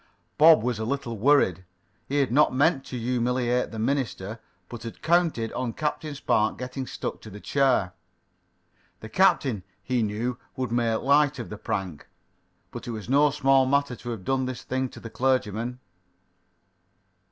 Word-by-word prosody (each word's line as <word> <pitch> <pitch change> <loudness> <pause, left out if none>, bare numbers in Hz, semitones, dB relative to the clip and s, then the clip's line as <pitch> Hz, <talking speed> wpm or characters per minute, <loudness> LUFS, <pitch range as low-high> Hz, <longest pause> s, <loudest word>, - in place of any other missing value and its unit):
Bob 155 -5 +7
was 120 -2 -1
a - - -2
little 120 -1 -3
worried. 110 - +3 0.4
He 140 - -3
had 130 - 0
not 145 0 +4
meant 140 0 +3
to 125 - -6
humiliate 125 +1 0
the 115 - -8
minister, 110 -4 -2 0.3
but 120 - -8
had 115 0 -9
counted 160 -9 +1
on 125 -2 -3
Captain 150 +1 -3
Spark 110 -5 +1
getting 125 +1 -5
stuck - - -5
to 110 - -10
the 105 0 -10
chair. 130 -9 +1 1.1
The 110 - -8
captain, 135 - +2 0.2
he 125 -2 0
knew, 115 +4 -2 0.2
would 130 -3 -3
make 115 -2 +1
light 145 +1 +3
of 120 - -7
the 105 - -6
prank. 90 -7 -4 0.6
But - - -8
it - - -3
was 110 -1 -7
no 145 +2 +5
small 135 -2 +3
matter 140 -1 +1
to 120 - -8
have 110 -6 -6
done 130 -1 0
this 130 -2 -6
thing 130 0 -2
to - - -12
the 115 - -9
clergyman. 125 -2 -1
125 Hz, 165 wpm, -26 LUFS, 115-135 Hz, 1.1 s, Bob